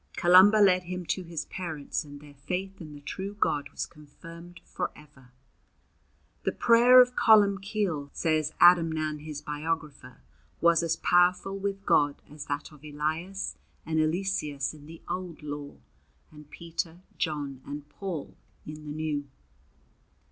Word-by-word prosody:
Columba 185 +4 +7
led 185 -3 +4
him 180 0 -5
to 185 - -1
his 170 -2 -5
parents, 160 -7 -4
and 145 -1 -11
their 145 0 -15
faith 185 +7 -5
in 155 -2 -9
the 145 - -12
true 195 +7 -6
God 145 -6 0
was - - -4
confirmed 165 +3 -13
for - - -3
ever. 140 -4 -18 1.1
The - - 0
prayer 240 +2 +6
of 250 0 +2
Columbcille, 200 -7 +3
says 155 -2 0
Adamnan 160 -3 +4
his 150 -1 -7
biographer, 150 -4 -5 0.4
was 170 0 +4
as 165 -1 0
powerful 180 +3 +2
with 195 0 -4
God 145 -1 +3
as 150 -1 -9
that 145 +2 -4
of 150 -1 -17
Elias 160 +6 -3 0.3
and 160 0 0
Eliseus 155 -4 -1
in 150 -1 -14
the 165 +1 -12
old 180 -4 -5
law, 145 -1 -6 0.6
and 150 -1 -14
Peter, 170 +1 -5 0.2
John, 145 -5 -3
and 145 +1 -8
Paul 170 -2 -6 0.3
in 155 0 -9
the - - -5
new. 150 -2 -3
160 Hz, 140 wpm, -28 LUFS, 150-180 Hz, 1.1 s, Columba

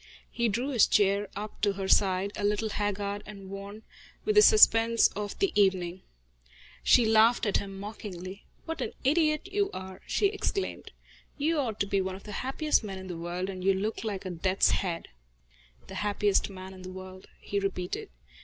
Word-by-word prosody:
He 235 -1 0
drew 240 +7 -1
his 245 -6 +4
chair 200 0 +2
up 210 +2 -7
to 205 -1 +2
her 195 0 -4
side, 190 0 +3
a 205 - -4
little 210 +2 +1
haggard 205 0 -2
and 195 -2 -10
worn 200 +2 -8 0.4
with 430 - +2
the 420 - +7
suspense 230 - +6
of 205 0 -5
the 390 -2 +1
evening. 185 -3 +1 0.8
She 240 - +5
laughed 220 +2 +4
at 205 - +2
him 195 -1 -6
mockingly. 195 -2 -8 0.2
"What 325 0 -4
an - - -3
idiot 305 +4 +2
you 400 0 +1
are!" 190 0 -8
she - - +1
exclaimed. 400 -1 -2 0.5
"You 310 +2 +1
ought 225 -6 -2
to - - +3
be 195 0 0
one 190 0 -3
of 195 - -12
the 210 - -9
happiest 270 +2 +1
men 195 -2 -5
in 190 0 -9
the 175 - -4
world, 175 +2 -4
and 185 -2 -6
you 195 0 +3
look 210 +4 -3
like 205 -3 -4
a 185 - -3
death's 185 +3 +2
head." 175 -4 -2 0.8
"The - - -11
happiest 205 -1 +1
man 190 -1 -9
in 185 - -12
the 185 - -8
world," 185 0 -10
he 200 - -2
repeated. 185 -2 -3
200 Hz, 190 wpm, -28 LUFS, 190-225 Hz, 0.8 s, the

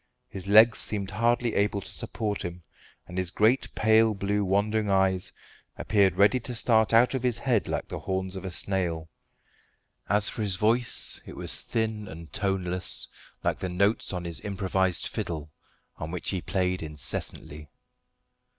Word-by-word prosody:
His 95 0 -8
legs 110 +2 +7
seemed 100 -2 -2
hardly 115 +2 +1
able 100 0 +1
to - - -8
support 105 -3 -3
him, 85 0 -6 0.4
and 90 +1 -5
his 90 -2 -1
great 110 +7 +2
pale 110 0 +4
blue 100 +1 -1
wandering 105 +2 0
eyes 95 -1 +2 0.5
appeared 100 -4 +2
ready 100 +7 +4
to 120 +1 -6
start 110 -1 +3
out 120 +2 +5
of 130 - -1
his 125 -2 0
head 120 -5 0
like - - -3
the - - -6
horns 95 0 -3
of 95 - -6
a 95 - -4
snail. 85 -3 -2 1.0
As 105 0 +3
for - - -2
his 100 -3 +1
voice, 115 +5 +4
it - - -9
was - - 0
thin 110 -2 -2
and 80 0 -11
toneless, 95 -3 -2 0.4
like - - 0
the 95 - -3
notes 100 +5 +1
on 90 -2 -4
his 85 -1 -3
improvised 95 -2 0
fiddle, 75 -3 -4 0.5
on 80 - -6
which 90 +1 -3
he 95 -3 -2
played 90 0 -1
incessantly. 75 -1 -4
100 Hz, 160 wpm, -27 LUFS, 90-110 Hz, 1.0 s, legs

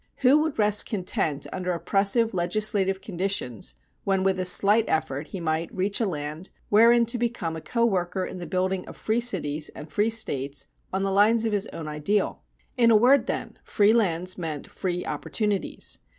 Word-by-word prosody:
Who 275 +4 +7
would 315 -1 -1
rest 210 -1 +3
content 160 -7 -1
under 180 -1 -2
oppressive 200 +6 +1
legislative 195 +1 +1
conditions 165 - -2 0.3
when 195 -1 +1
with 190 -1 +1
a 185 - -1
slight 205 +4 +3
effort 145 -1 -1
he 190 - -6
might 160 0 -1
reach 195 +2 -1
a 225 - +2
land 155 +1 -5 0.2
wherein 235 +3 +6
to 235 +1 -3
become 230 -9 -2
a 160 - -6
co 235 +6 0
worker 185 -3 0
in 185 - -7
the 175 - -6
building 185 0 -1
of - - -10
free 220 +2 0
cities 160 -10 -2
and 150 - -8
free 210 +2 +2
States 140 -11 -2 0.3
on 190 +1 -1
the 195 - 0
lines 220 +3 +4
of 220 - 0
his 205 0 0
own 160 -2 -7
ideal? 150 +8 -1 0.4
In 235 -2 +5
a 225 - +6
word, 250 +3 +5
then, - - -4
free 210 0 +3
lands 185 -5 0
meant 155 -4 -4
free 180 -2 -3
opportunities. 210 -3 -2
195 Hz, 180 wpm, -25 LUFS, 170-220 Hz, 0.4 s, Who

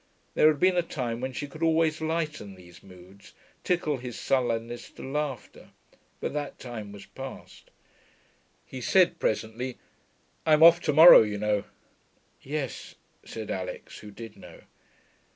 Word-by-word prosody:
There - - +5
had 155 -2 +2
been 185 +2 +3
a - - +4
time 125 -8 -4
when 130 +1 -3
she 135 +3 -5
could 155 +3 -13
always 160 -1 +2
lighten 155 - -3
these 90 -1 -16
moods, 95 +1 -16 0.3
tickle 165 -5 0
his 125 -1 -8
sullenness 120 -2 -1
to - - -11
laughter; 135 -4 -5 0.5
but - - -4
that 145 -1 -4
time 110 -5 -8
was 100 -1 -11
past. - - -11 1.0
He 130 - -9
said 175 +6 +3
presently, 110 +4 -2 0.7
'I'm 155 0 +4
off 170 +1 +8
to 150 - +2
morrow, 160 +4 +10
you 105 -2 -2
know.' 105 -1 -1 0.8
'Yes,' 140 -1 -5 0.3
said 110 -2 -7
Alix, 95 -1 -6
who 105 - -11
did 110 +1 -11
know. - - -14
130 Hz, 145 wpm, -27 LUFS, 110-155 Hz, 1.0 s, morrow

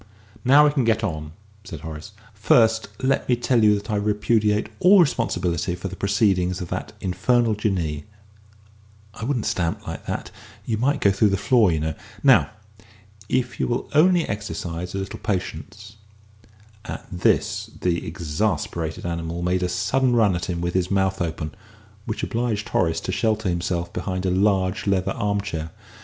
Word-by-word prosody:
"Now 140 +4 +7
we 150 - +4
can 140 -3 +1
get 115 -1 +1
on," 80 -6 -3 0.3
said 80 -8 -8
Horace. 80 +6 -8 0.2
"First 110 +2 +3 0.2
let 135 0 +1
me 125 - +5
tell 120 -1 +1
you 105 -1 +6
that 105 +2 -5
I 105 - +1
repudiate 105 +1 +1
all 190 +2 +7
responsibility 90 - +1
for 90 +2 -5
the 95 - -7
proceedings 95 -2 +1
of 90 - -6
that - - -4
infernal 110 +5 +1
Jinnee.... 90 -8 -2 1.1
I 110 - -8
wouldn't 125 -4 -1
stamp 85 -2 -1
like - - -7
that - - -4 0.3
you 110 -2 -1
might 140 +4 +1
go 100 - +5
through 100 +2 +3
the 100 - +1
floor, 110 -2 +3
you 80 - 0
know.... 80 0 -1 0.3
Now, - - +6 0.8
if 125 -1 -1
you - - +1
will 120 +1 -2
only 170 +3 +4
exercise 90 -3 -4
a - - -1
little 95 +1 -5
patience 105 +2 -5 0.4
" 105 0 -27
At - - -6
this 90 -2 +1
the 85 -1 0
exasperated 80 0 -2
animal 85 0 -3
made 90 +1 +1
a 90 - 0
sudden 120 +8 +1
run 105 -5 +4
at 85 - -3
him 85 -2 -3
with 85 0 -2
his 95 -1 0
mouth 95 -1 +1
open, 80 -2 -3 0.5
which 110 - -3
obliged 115 -3 -2
Horace 80 -2 +1
to - - -3
shelter 110 0 0
himself 85 0 -2
behind 95 0 -3
a 90 - +1
large 95 0 +1
leather 95 -2 +1
arm 100 -1 -1
chair. 80 -5 -5
100 Hz, 170 wpm, -23 LUFS, 85-110 Hz, 1.1 s, Now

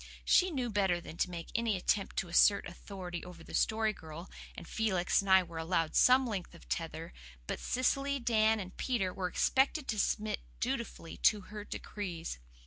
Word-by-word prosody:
She 370 0 +5
knew 255 -8 -2
better 195 -4 +2
than 165 - -9
to 180 - +1
make 170 -2 -6
any 230 -3 +1
attempt 195 +2 0
to 190 - 0
assert 200 +4 +5
authority 175 -1 -7
over 180 -2 -10
the - - -12
Story 220 0 +2
Girl, 160 0 -10 0.2
and 170 - -9
Felix 195 -6 +1
and 200 - -6
I 190 0 +7
were 165 -2 -7
allowed 165 -1 0
some 255 +1 +6
length 200 -7 -4
of - - -16
tether; 65 -1 -4 0.3
but - - -3
Cecily, 275 +2 +1
Dan, 220 -3 +3
and 185 -1 -7
Peter 205 -8 0
were 185 -1 -2
expected 265 - +2
to 215 - 0
submit 210 0 0 0.2
dutifully 235 -9 -3
to 210 -2 +4
her 210 +2 -8
decrees. 175 - -5
200 Hz, 180 wpm, -32 LUFS, 175-225 Hz, 0.3 s, I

